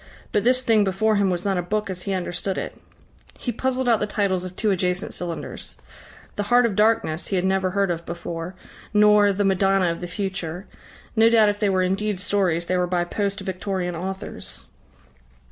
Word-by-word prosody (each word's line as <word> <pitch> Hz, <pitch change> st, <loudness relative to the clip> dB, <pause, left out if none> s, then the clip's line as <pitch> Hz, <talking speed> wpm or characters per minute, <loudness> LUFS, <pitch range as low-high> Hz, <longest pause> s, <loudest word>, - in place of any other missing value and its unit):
But 205 Hz, -, +1 dB
this 255 Hz, +2 st, +3 dB
thing 225 Hz, -4 st, +4 dB
before 205 Hz, +3 st, +1 dB
him 200 Hz, -1 st, +2 dB
was 180 Hz, 0 st, -2 dB
not 195 Hz, -2 st, +1 dB
a -, -, +1 dB
book 210 Hz, +4 st, -2 dB
as 185 Hz, -2 st, -5 dB
he 195 Hz, +1 st, -3 dB
understood 185 Hz, +1 st, -2 dB
it. -, -, -4 dB, 0.6 s
He 245 Hz, -, -3 dB
puzzled 260 Hz, +2 st, -1 dB
out 230 Hz, -3 st, +4 dB
the 210 Hz, -, -1 dB
titles 195 Hz, -4 st, 0 dB
of 185 Hz, 0 st, -7 dB
two 215 Hz, 0 st, +1 dB
adjacent 180 Hz, 0 st, -1 dB
cylinders. 175 Hz, -2 st, -6 dB, 0.6 s
"The -, -, 0 dB
Heart 245 Hz, 0 st, +5 dB
of 220 Hz, -4 st, 0 dB
Darkness" 210 Hz, -6 st, +2 dB
he 195 Hz, -, -1 dB
had 180 Hz, 0 st, +1 dB
never 190 Hz, 0 st, +1 dB
heard 195 Hz, 0 st, +1 dB
of 170 Hz, -1 st, -3 dB
before 170 Hz, +1 st, -6 dB, 0.4 s
nor 210 Hz, -1 st, +6 dB
"The 200 Hz, +1 st, 0 dB
Madonna 195 Hz, -2 st, +3 dB
of 170 Hz, -, -6 dB
the 175 Hz, -, -4 dB
Future" 185 Hz, -1 st, -4 dB, 0.5 s
no 225 Hz, 0 st, +6 dB
doubt 220 Hz, -2 st, +5 dB
if 205 Hz, 0 st, -2 dB
they 210 Hz, -, +2 dB
were 185 Hz, -1 st, +2 dB
indeed 195 Hz, +1 st, -1 dB
stories, 185 Hz, -4 st, +1 dB
they 185 Hz, +1 st, 0 dB
were 180 Hz, 0 st, +1 dB
by 175 Hz, -1 st, +1 dB
post 200 Hz, +2 st, -2 dB
Victorian 185 Hz, -2 st, -3 dB
authors. 190 Hz, +3 st, -6 dB
195 Hz, 195 wpm, -23 LUFS, 180-210 Hz, 0.6 s, nor